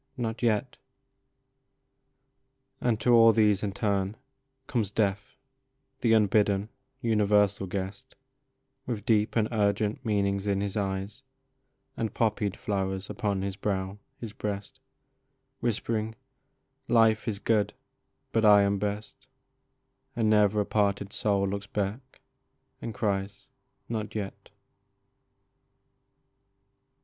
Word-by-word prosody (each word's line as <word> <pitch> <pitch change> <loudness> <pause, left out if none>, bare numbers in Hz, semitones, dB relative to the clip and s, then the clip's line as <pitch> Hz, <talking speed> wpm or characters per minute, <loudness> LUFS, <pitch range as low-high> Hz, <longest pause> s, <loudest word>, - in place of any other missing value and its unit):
Not 115 -2 -3
yet! 110 -4 0 1.0
" - - -49
And 115 -3 +1
to 120 +2 +4
all 115 -1 +8
these 105 -3 +3
in 105 - -1
turn, 100 0 -1 0.5
Comes 115 -7 -1
Death, 105 -1 -1 0.6
the 115 -2 +3
unbidden, 105 -1 +3 0.3
universal 105 -4 +2
guest, 100 +7 -5 0.7
With 110 -4 -3
deep 110 -1 +2
and 110 -2 +3
urgent 105 +2 0
meanings 100 -3 0
in 100 -1 +1
his 100 -1 -2
eyes, 100 +3 -3 0.7
And 110 -1 -3
poppied 105 -3 0
flowers 95 -1 -2
upon 100 -1 -1
his 100 -1 -3
brow, 95 0 -2 0.2
his 115 -3 -7
breast, 100 -2 -5 0.8
Whispering, 110 -1 -1 0.4
" - - -48
Life 115 -2 +4
is 105 -3 -1
good, 105 0 +1 0.6
but 115 - +1
I 105 -1 +7
am 100 0 +1
best; 105 +1 -4 0.4
" - - -48
And 110 -2 +2
never 105 0 +4
a - - -1
parted 100 -1 0
soul 100 -2 +1
looks 100 +1 -4
back 105 +7 -4 0.6
and 115 - -4
cries, 100 -2 -2 0.2
" - - -48
Not 110 -1 -4
yet 100 -2 -5
105 Hz, 120 wpm, -28 LUFS, 100-110 Hz, 1.0 s, all